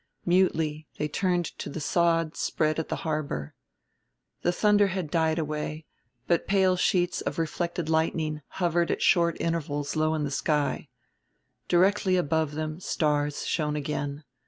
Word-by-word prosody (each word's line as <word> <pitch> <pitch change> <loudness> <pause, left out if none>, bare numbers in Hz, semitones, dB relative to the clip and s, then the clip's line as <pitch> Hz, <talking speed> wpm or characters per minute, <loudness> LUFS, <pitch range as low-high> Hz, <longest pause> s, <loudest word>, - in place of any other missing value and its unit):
Mutely 160 -4 +1
they 150 - -1
turned 175 +2 0
to - - -4
the 160 - -5
sod 165 +1 +1
spread 155 0 0
at 160 - -4
the - - -1
harbor. 150 - -2 0.9
The 175 - +2
thunder 205 +2 +4
had 185 -5 -3
died 160 -1 +2
away, 155 0 -3 0.4
but 170 - +1
pale 190 -2 +3
sheets 180 -1 +1
of - - -3
reflected 170 +1 -2
lightning 160 -1 0 0.2
hovered 175 -1 +1
at - - -1
short 170 -2 +4
intervals 150 -3 -2
low 155 0 +2
in 155 - -1
the 145 - -2
sky. 150 +1 0 0.8
Directly 185 +1 +3
above 160 -2 0
them 155 +1 -3
stars 150 -4 0
shone 150 -2 0
again. 145 0 -3
160 Hz, 145 wpm, -27 LUFS, 150-175 Hz, 0.9 s, thunder